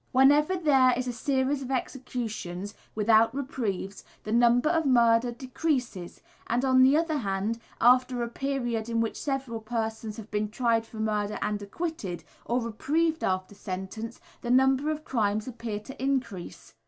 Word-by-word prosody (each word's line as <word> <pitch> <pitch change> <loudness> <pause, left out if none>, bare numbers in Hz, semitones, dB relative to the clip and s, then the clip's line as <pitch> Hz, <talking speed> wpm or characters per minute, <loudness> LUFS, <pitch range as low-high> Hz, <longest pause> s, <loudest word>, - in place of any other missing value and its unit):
Whenever 290 +6 +5
there 265 -7 +4
is 255 0 -2
a 245 - -2
series 265 +3 0
of 260 - -6
executions, 225 -7 -4 0.2
without 220 +3 +4
reprieves, 220 -8 -3 0.2
the 215 - -5
number 240 +3 +4
of 325 0 +2
murders 240 -2 +4
decreases, 255 - -3 0.3
and 245 +3 +1
on 260 -1 +5
the 265 +3 +6
other 320 -1 +1
hand, 200 +1 -2 0.2
after 250 0 +4
a - - -2
period 240 -3 -2
in 230 0 0
which 225 -1 0
several 270 -5 -3
persons 220 -1 -4
have 220 -1 -10
been 210 0 -1
tried 230 0 +1
for 225 - -11
murder 210 -1 -1
and 210 0 -1
acquitted, 205 - -4 0.2
or 240 +2 +1
reprieved 310 +9 0
after 185 +1 -1
sentence, 205 +4 -6 0.2
the 240 - -5
number 265 +3 +4
of 310 0 -3
crimes 215 -2 0
appears 225 -4 -5
to 265 +1 -8
increase. 245 - -3
240 Hz, 155 wpm, -28 LUFS, 215-265 Hz, 0.3 s, the